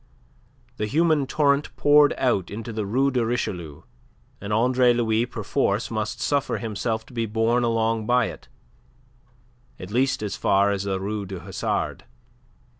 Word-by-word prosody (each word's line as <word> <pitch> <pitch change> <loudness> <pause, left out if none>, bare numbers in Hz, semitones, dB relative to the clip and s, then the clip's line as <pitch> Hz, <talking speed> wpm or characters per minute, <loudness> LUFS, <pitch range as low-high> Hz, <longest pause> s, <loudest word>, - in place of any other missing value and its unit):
The 105 - -2
human 155 +1 +2
torrent 145 -1 +1
poured 145 0 +5
out 120 -8 +1
into 115 +2 -6
the 105 -2 -3
Rue 135 +6 +2
de 125 -2 +1
Richelieu, 95 -10 -3 0.6
and 100 +1 -5
Andre 125 +3 +3
Louis 115 0 +1
perforce 105 -1 -1
must 110 -1 -3
suffer 140 -1 0
himself 110 0 -3
to - - -17
be 115 -2 -1
borne 115 +3 +1
along 115 -1 0
by 125 0 +3
it, - - -8 1.3
at 90 +2 -8
least 130 0 +1
as 105 - -3
far 100 +1 +2
as 100 -1 -2
the 95 -1 -1
Rue 100 +1 -4
du 95 -2 -7
Hasard. 95 +2 -3
115 Hz, 150 wpm, -24 LUFS, 105-125 Hz, 1.3 s, poured